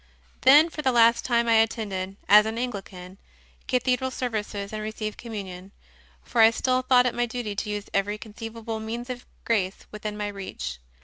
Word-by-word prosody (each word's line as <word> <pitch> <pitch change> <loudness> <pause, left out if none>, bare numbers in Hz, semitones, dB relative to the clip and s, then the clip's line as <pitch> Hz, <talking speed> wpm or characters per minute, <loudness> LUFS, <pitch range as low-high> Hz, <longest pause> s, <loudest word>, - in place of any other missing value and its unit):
Then 295 +5 +7
for 305 - -5
the 265 -3 +2
last 235 -1 +4
time 235 -1 +2
I 230 -1 +5
attended, 200 -4 -1
as 210 +1 +7
an 220 +1 -3
Anglican, 195 -6 -6 0.5
cathedral 255 0 +1
services 215 -5 -4
and 215 - -3
received 215 0 -5
Communion; 195 -5 -7 0.5
for 235 - +1
I 225 - +9
still 255 +2 0
thought 255 -1 +4
it 245 - +1
my 240 0 0
duty 230 -3 -4
to 210 - -2
use 210 -1 -3
every 205 +1 0
conceivable 225 +1 -7
means 235 +3 -5
of 250 0 -8 0.2
grace 195 -4 0
within 210 0 -5
my 210 0 -2
reach. 65 - -6
220 Hz, 175 wpm, -26 LUFS, 205-240 Hz, 0.5 s, I